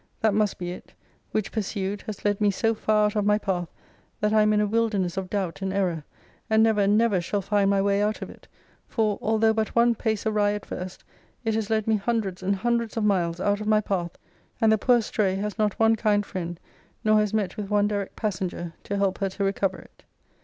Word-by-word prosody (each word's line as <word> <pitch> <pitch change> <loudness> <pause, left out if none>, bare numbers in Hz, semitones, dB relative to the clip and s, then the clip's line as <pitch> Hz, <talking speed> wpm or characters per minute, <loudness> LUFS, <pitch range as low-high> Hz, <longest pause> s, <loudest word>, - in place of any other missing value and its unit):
that 220 -2 +3
must 210 -1 +1
be 175 -1 -4
it: 180 - -11 0.3
which 215 -2 -2
pursued, 200 -2 -3
has 210 -2 -7
led 205 0 +1
me 205 - +4
so 225 +3 +1
far 215 -1 +2
out 210 - -1
of 210 - +1
my 210 +1 +3
path, 180 -5 -2 0.5
that 210 0 +1
I 215 - +5
am 215 0 +4
in 210 - +3
a 210 - +3
wilderness 205 -5 0
of 190 -1 -4
doubt 180 -7 -3
and 190 0 -1
error; 180 -5 -1 0.5
and 220 0 +4
never, 210 -3 +3
never, 210 -2 +3
shall 200 +3 -2
find 200 0 +2
my 195 -1 +2
way 200 0 +2
out 210 +1 -1
of - - -8
it: - - -17 0.4
for, 215 -3 0
although 220 0 +3
but 220 -1 -2
one 235 0 +5
pace 220 -2 -2
awry 210 -1 +2
at 210 -1 -5
first, 185 0 -7 0.4
it 225 - +1
has 220 -1 -1
led 220 -1 +1
me 220 -1 +2
hundreds 200 -3 -2
and 195 +2 +1
hundreds 235 +2 -1
of 225 - 0
miles 175 -5 +1
out 205 +2 0
of 210 - -4
my 215 0 +4
path: 180 -5 -3 0.4
and 220 -1 +4
the 220 - +4
poor 245 +3 +4
estray 210 -4 0
has 210 +2 -4
not 210 -2 +1
one 225 0 +5
kind 205 -2 +1
friend, 175 -3 -5 0.4
nor 215 -1 +4
has 210 -1 +1
met 205 -4 -1
with 205 -2 -5
one 205 -1 +3
direct 205 -2 -3
passenger, 185 -5 -3
to 200 - -2
help 195 -1 0
her 195 -1 0
to 195 +1 -4
recover 195 -1 0
it. - - -17
205 Hz, 230 wpm, -25 LUFS, 195-215 Hz, 0.5 s, I